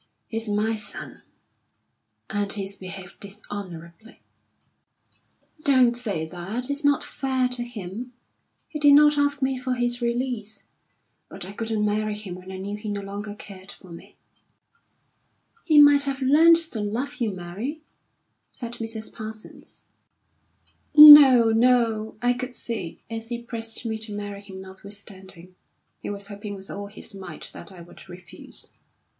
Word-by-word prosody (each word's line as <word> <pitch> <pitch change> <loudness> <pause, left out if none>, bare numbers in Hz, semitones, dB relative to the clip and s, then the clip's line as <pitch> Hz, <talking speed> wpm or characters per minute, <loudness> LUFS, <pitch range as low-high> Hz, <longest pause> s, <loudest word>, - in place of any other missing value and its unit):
"He's 225 -1 -3
my 210 +2 +1
son, 210 -2 -3 1.1
and 205 -1 -2
he's 195 -1 -3
behaved 185 -1 -10
dishonourably." 200 -1 -9 1.4
"Don't 255 -4 +4
say 205 -10 -2
that. 195 - -5
It's 285 +2 -1
not 285 -1 +3
fair 260 -2 -1
to 250 -1 -2
him. 235 +1 -7 0.6
He 300 - -6
did 290 -1 +6
not 295 0 +6
ask 285 -1 +1
me 265 -1 0
for 255 0 -2
his 245 0 -1
release. 235 -3 -3 0.7
But - - -8
I 190 - -8
couldn't 220 0 -2
marry 210 0 -1
him 210 -4 -7
when 185 +1 -10
I 190 - -6
knew 200 +2 -5
he 210 0 -6
no 205 -1 -3
longer 205 +1 -7
cared 195 -1 -10
for 185 - -16
me." 170 - -13 1.5
"He 310 -3 +6
might 290 -1 +7
have 275 -1 -2
learned 305 +5 +6 0.2
to 225 - -4
love 245 +7 -3
you, 235 -4 0
Mary," 195 - -6 0.7
said 235 -2 -7
Mrs. 225 -1 -5
Parsons. 220 -1 -8 1.1
"No, 285 -6 +11
no! 225 -2 +2
I 245 0 +3
could 250 0 -6
see, 220 -8 -4
as 225 0 -6
he 240 -1 -3
pressed 230 -1 -6
me 220 -1 -3
to 215 -1 -6
marry 205 -1 -6
him 190 -2 -10
notwithstanding, 190 -2 -10 0.5
he - - -5
was 200 -1 -4
hoping 205 0 -7
with 195 0 -7
all 200 0 -6
his 205 +1 -9
might 195 -1 -9
that - - -11
I 180 -2 -12
would 175 +2 -15
refuse. 175 -2 -11
220 Hz, 150 wpm, -24 LUFS, 200-250 Hz, 1.5 s, No